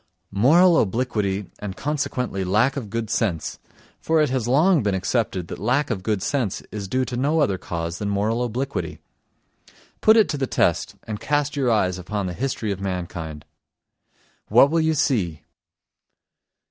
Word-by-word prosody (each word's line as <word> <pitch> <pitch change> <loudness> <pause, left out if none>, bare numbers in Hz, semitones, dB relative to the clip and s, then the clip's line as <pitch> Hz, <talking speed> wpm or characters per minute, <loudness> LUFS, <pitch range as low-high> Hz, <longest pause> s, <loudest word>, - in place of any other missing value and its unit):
Moral 165 - +5
obliquity 105 -3 -1
and 100 -2 -6
consequently 140 -8 -2
lack 105 +9 +2
of 125 -7 -5
good 115 +1 -3
sense; 90 -10 -1 0.4
for 160 0 +1
it 150 -4 +2
has 130 -3 -1
long 155 +6 +4
been 100 -3 0
accepted 95 -2 -1
that - - -7
lack 125 +7 +1
of 100 -5 -2
good 105 -1 -1
sense 125 -9 -1
is 100 -2 -5
due 130 +5 0
to 125 - -5
no 145 +6 +1
other 100 -11 +1
cause 85 +1 -4
than 105 - -2
moral 110 +4 0
obliquity. 125 +4 -3 1.0
Put 220 +1 +6
it 220 - +5
to 145 - -2
the 135 - 0
test - - +1
and 105 -2 -5
cast 145 0 0
your 135 -3 +1
eyes 95 -5 +1
upon 100 +2 -3
the 90 - -3
history 120 -1 -2
of 100 -1 -4
mankind. 85 -5 -5 1.0
What 140 - +6
will 165 0 +2
you 160 0 +2
see? 100 - 0
115 Hz, 165 wpm, -23 LUFS, 95-140 Hz, 1.0 s, Put